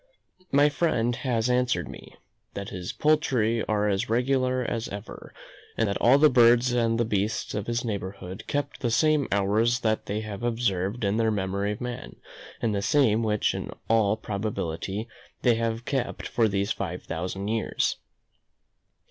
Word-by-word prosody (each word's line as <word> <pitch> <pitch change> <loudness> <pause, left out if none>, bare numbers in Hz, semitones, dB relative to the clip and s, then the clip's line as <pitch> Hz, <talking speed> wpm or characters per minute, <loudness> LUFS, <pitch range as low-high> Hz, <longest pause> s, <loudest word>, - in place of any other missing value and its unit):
My 145 +1 +5
friend 130 -6 +1
has 120 -3 0
answered 125 0 +1
me, - - -11 0.4
"that 100 0 -5
his 90 -1 -5
poultry 125 -8 +2
are 105 -1 +1
as 100 0 0
regular 130 +2 +1
as 115 -1 -3
ever, 100 +2 -8 0.5
and 115 - +2
that 100 - -1
all 125 +4 +6
the 155 +2 +7
birds 120 -1 +5
and 115 -1 +1
the 120 - +2
beasts 105 0 -1
of 105 -1 -3
his 120 +1 -1
neighbourhood 95 -3 -5
keep 145 0 -2
the 120 - 0
same 150 +3 +3
hours 110 +4 +2
that 110 -1 0
they 105 +2 -2
have 105 -1 -6
observed 115 -3 -1
in 100 +1 +1
the 115 -1 +2
memory 100 0 -1
of 105 - -10
man; 125 -1 -6 0.5
and 110 -2 +1
the 100 - 0
same 115 -2 +3
which 105 -2 +1
in - - -5 0.2
all 110 -2 +3
probability 100 -1 -3 0.4
they 120 - +5
have 115 +1 -2
kept 135 -3 -2
for 115 -2 +2
these 100 +1 -1
five 90 -2 -4
thousand 95 +4 -4
years." 110 0 0
115 Hz, 165 wpm, -26 LUFS, 100-120 Hz, 0.5 s, the